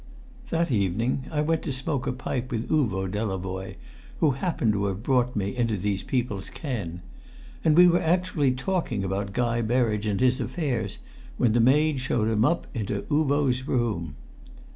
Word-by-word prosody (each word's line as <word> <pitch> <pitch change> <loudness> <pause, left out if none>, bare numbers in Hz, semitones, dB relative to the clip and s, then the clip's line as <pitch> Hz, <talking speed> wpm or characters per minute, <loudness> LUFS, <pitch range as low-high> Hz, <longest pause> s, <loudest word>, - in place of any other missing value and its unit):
That 165 -2 0
evening 115 +5 0
I 150 -2 0
went 160 +1 +1
to - - -3
smoke 135 0 -2
a - - +1
pipe 125 0 -3
with 115 -1 -3
Uvo 105 - +1
Delavoye, 95 -1 -3 0.4
who 155 - +4
happened 130 - 0
to 100 0 0
have 100 +1 -3
brought 125 -1 +1
me 100 +2 -2
into 115 -4 0
these 100 +1 -1
people's 115 -7 -2
ken. 100 - -5 0.6
And 155 0 +4
we 180 0 +9
were 175 0 +3
actually 165 -5 +1
talking 130 - -1
about 100 +1 -2
Guy 120 +1 0
Berridge 110 -2 +1
and 100 -2 0
his 130 +1 +3
affairs 135 -3 -2 0.4
when 115 -3 +3
the 120 - +3
maid 145 +4 +4
showed 120 -3 0
him 110 -1 +2
up 170 +6 +1
into 100 -4 -3
Uvo's 140 -3 +1
room. 105 - -1
120 Hz, 165 wpm, -26 LUFS, 105-140 Hz, 0.6 s, we